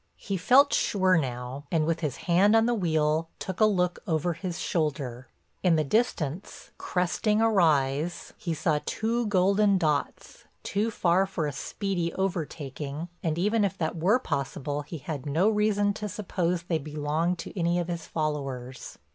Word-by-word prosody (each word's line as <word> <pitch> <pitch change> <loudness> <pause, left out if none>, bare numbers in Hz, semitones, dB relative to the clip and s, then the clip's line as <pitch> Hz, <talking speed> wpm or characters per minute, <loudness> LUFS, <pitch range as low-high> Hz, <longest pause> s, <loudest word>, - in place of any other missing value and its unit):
He 200 - -4
felt 260 +10 +5
sure 185 -2 +3
now, 130 -2 -3
and 160 -2 +2
with 165 +1 0
his 150 -6 -3
hand 190 +5 +4
on 225 0 +5
the 240 - +2
wheel 160 -5 +1
took 190 -1 -5
a 215 - +6
look 180 -4 +1
over 165 +1 0
his 175 +1 -5
shoulder. 140 -6 -2 0.3
In 180 -3 +4
the 155 - +2
distance, 170 - -2
cresting 200 +4 0
a 225 - +4
rise, 155 -3 +1
he 170 -3 -3
saw 155 -1 +1
two 230 +1 -1
golden 200 +1 +3
dots, 155 -5 -2 0.2
too 210 +3 0
far 190 -2 +2
for 185 -5 -2
a 145 - -1
speedy 175 - -2
overtaking, 155 -4 -3
and 160 -1 -1
even 210 +5 +2
if 200 - -1
that 160 0 -2
were 185 +8 +3
possible 145 - -3
he 155 +3 -7
had 145 0 -6
no 165 +8 +2
reason 210 -1 +2
to 210 0 -5
suppose 180 -4 -2
they 170 -2 -1
belonged 155 +4 -1
to 165 - -8
any 170 -1 +1
of 175 -1 -1
his 170 -2 -5
followers. 135 -5 -4
170 Hz, 165 wpm, -27 LUFS, 150-195 Hz, 0.3 s, a